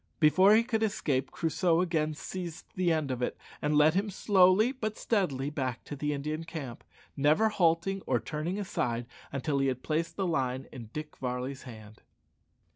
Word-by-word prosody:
Before 185 Hz, +6 st, +6 dB
he 225 Hz, -, +5 dB
could 230 Hz, -2 st, -1 dB
escape, 145 Hz, -11 st, 0 dB
Crusoe 165 Hz, +1 st, +1 dB
again 160 Hz, -4 st, 0 dB
seized 175 Hz, 0 st, -6 dB
the 180 Hz, -2 st, +1 dB
end 155 Hz, -4 st, 0 dB
of 125 Hz, -1 st, -3 dB
it, 125 Hz, -, -1 dB, 0.2 s
and 150 Hz, 0 st, +2 dB
led 150 Hz, +1 st, +6 dB
him 200 Hz, +3 st, 0 dB
slowly 195 Hz, +3 st, +4 dB
but 215 Hz, -5 st, -4 dB
steadily 145 Hz, -, 0 dB
back 130 Hz, -5 st, -3 dB
to 145 Hz, -, -7 dB
the 150 Hz, +1 st, -2 dB
Indian 150 Hz, +3 st, -3 dB
camp, 150 Hz, -7 st, -7 dB, 0.3 s
never 155 Hz, +10 st, +3 dB
halting 185 Hz, 0 st, +1 dB
or 125 Hz, -2 st, +2 dB
turning 155 Hz, -, -3 dB
aside 120 Hz, -, -2 dB, 0.3 s
until 140 Hz, +1 st, -1 dB
he 135 Hz, -, +2 dB
had 130 Hz, -1 st, -2 dB
placed 165 Hz, +2 st, -1 dB
the 195 Hz, -, -1 dB
line 135 Hz, -6 st, -1 dB
in 120 Hz, -5 st, -9 dB
Dick 150 Hz, +2 st, -7 dB
Varley's 125 Hz, +1 st, -3 dB
hand. 110 Hz, -2 st, -12 dB
155 Hz, 175 wpm, -30 LUFS, 135-185 Hz, 0.3 s, Before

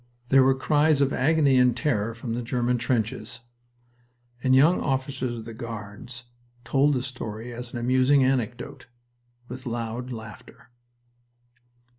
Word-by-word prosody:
There 135 Hz, 0 st, +6 dB
were 130 Hz, 0 st, +4 dB
cries 150 Hz, +2 st, +3 dB
of 140 Hz, -1 st, +2 dB
agony 145 Hz, -1 st, +3 dB
and 125 Hz, -1 st, +4 dB
terror 115 Hz, -4 st, 0 dB
from 115 Hz, 0 st, -5 dB
the 120 Hz, -, -2 dB
German 125 Hz, 0 st, 0 dB
trenches, 115 Hz, 0 st, -2 dB, 1.0 s
and 130 Hz, +1 st, +3 dB
young 155 Hz, +7 st, +5 dB
officers 130 Hz, -2 st, -2 dB
of 115 Hz, -1 st, -8 dB
the 115 Hz, -, -8 dB
Guards 115 Hz, +1 st, -8 dB, 0.4 s
told 135 Hz, +4 st, +2 dB
the 125 Hz, -, -1 dB
story 120 Hz, -3 st, -6 dB
as 120 Hz, 0 st, -7 dB
an -, -, -5 dB
amusing 130 Hz, +3 st, +3 dB
anecdote, 125 Hz, -2 st, -2 dB, 0.6 s
with 125 Hz, +1 st, -8 dB
loud 120 Hz, +1 st, -4 dB
laughter. 110 Hz, -1 st, -11 dB
125 Hz, 135 wpm, -25 LUFS, 115-135 Hz, 1.0 s, There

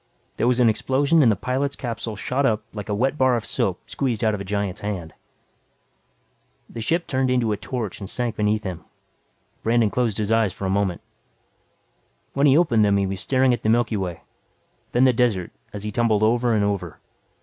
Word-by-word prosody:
There 120 Hz, -, +1 dB
was 125 Hz, 0 st, +2 dB
an 120 Hz, -, +5 dB
explosion 135 Hz, +8 st, +2 dB
and 120 Hz, -5 st, +5 dB
the -, -, +1 dB
pilot's 130 Hz, +6 st, -2 dB
capsule 115 Hz, -3 st, -5 dB
shot 130 Hz, +6 st, -1 dB
up 110 Hz, -4 st, +1 dB
like 105 Hz, 0 st, -7 dB
a 105 Hz, -, 0 dB
wet 135 Hz, +7 st, 0 dB
bar 130 Hz, -1 st, +4 dB
of 115 Hz, -3 st, -3 dB
soap -, -, -1 dB
squeezed 125 Hz, -6 st, -2 dB
out 110 Hz, -1 st, +3 dB
of 105 Hz, -, -3 dB
a -, -, -3 dB
giant's 100 Hz, 0 st, -3 dB
hand. 90 Hz, -6 st, -4 dB, 1.5 s
The 115 Hz, -, -7 dB
ship 170 Hz, +9 st, 0 dB
turned 130 Hz, -1 st, 0 dB
into 125 Hz, -3 st, +1 dB
a 105 Hz, -, -1 dB
torch 115 Hz, -5 st, -5 dB
and 100 Hz, -2 st, -7 dB
sank 120 Hz, -3 st, -2 dB
beneath 105 Hz, 0 st, 0 dB
him. 90 Hz, -5 st, -5 dB, 0.8 s
Brandon 115 Hz, -2 st, +2 dB
closed 115 Hz, -2 st, 0 dB
his 105 Hz, 0 st, -1 dB
eyes 110 Hz, -4 st, +2 dB
for 100 Hz, -, -6 dB
a 95 Hz, -, 0 dB
moment. 95 Hz, -3 st, 0 dB, 1.3 s
When 140 Hz, +1 st, +3 dB
he 140 Hz, +1 st, +6 dB
opened 120 Hz, -11 st, +3 dB
them 100 Hz, -1 st, +3 dB
he 100 Hz, -, +1 dB
was 95 Hz, -1 st, -4 dB
staring 130 Hz, +2 st, +2 dB
at 120 Hz, -, -2 dB
the 110 Hz, -, 0 dB
Milky 115 Hz, 0 st, +2 dB
Way, 90 Hz, -4 st, -3 dB, 0.7 s
then 120 Hz, -, +3 dB
the 130 Hz, -1 st, +5 dB
desert 115 Hz, -7 st, +1 dB, 0.2 s
as 105 Hz, 0 st, -7 dB
he 105 Hz, -, -3 dB
tumbled 110 Hz, -1 st, +2 dB
over 120 Hz, +1 st, +2 dB
and 105 Hz, -, +2 dB
over. 100 Hz, -1 st, -2 dB
110 Hz, 205 wpm, -23 LUFS, 100-125 Hz, 1.5 s, he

